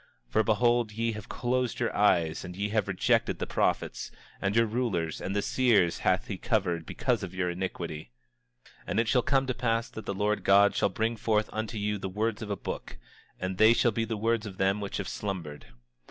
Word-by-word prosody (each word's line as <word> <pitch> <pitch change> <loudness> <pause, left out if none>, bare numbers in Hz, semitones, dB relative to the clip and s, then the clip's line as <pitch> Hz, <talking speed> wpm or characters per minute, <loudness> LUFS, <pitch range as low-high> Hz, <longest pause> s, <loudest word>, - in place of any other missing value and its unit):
For 110 - +2
behold, 120 +1 +2
ye 115 +1 0
have 105 -2 -8
closed 125 0 -1
your 120 - -1
eyes, 85 -6 +2
and 90 - -7
ye 100 +2 -2
have 110 -1 0
rejected 95 -1 +1
the - - -3
prophets; - - -1 0.3
and 100 +1 0
your 115 0 +5
rulers, 105 -9 -1
and 95 - -3
the 100 - +1
seers 110 -10 +3
hath 95 +6 +1
he 100 -7 -5
covered 90 -8 0
because 120 -4 0
of 95 -2 -6
your 90 -1 0
iniquity. 85 -6 -5 0.6
27:6 - - -20 0.2
And - - 0
it 115 - +1
shall 125 +2 +3
come 135 +1 +2
to 130 - -1
pass 115 -2 0
that 110 - -8
the 100 - -2
Lord 105 +1 0
God 100 +1 +5
shall - - +2
bring 110 +4 -1
forth 110 -1 0
unto 110 +1 -3
you 105 0 -1
the 95 - -4
words 110 +3 -1
of 110 - -5
a 100 - 0
book, - - -6 0.4
and 95 0 -3
they 110 +1 +7
shall 120 0 +3
be 115 +1 -1
the 110 -1 -3
words 115 0 0
of 95 -2 -9
them 95 +2 +1
which 100 - -4
have 100 - -4
slumbered. 85 -10 -5
105 Hz, 215 wpm, -29 LUFS, 95-115 Hz, 0.6 s, they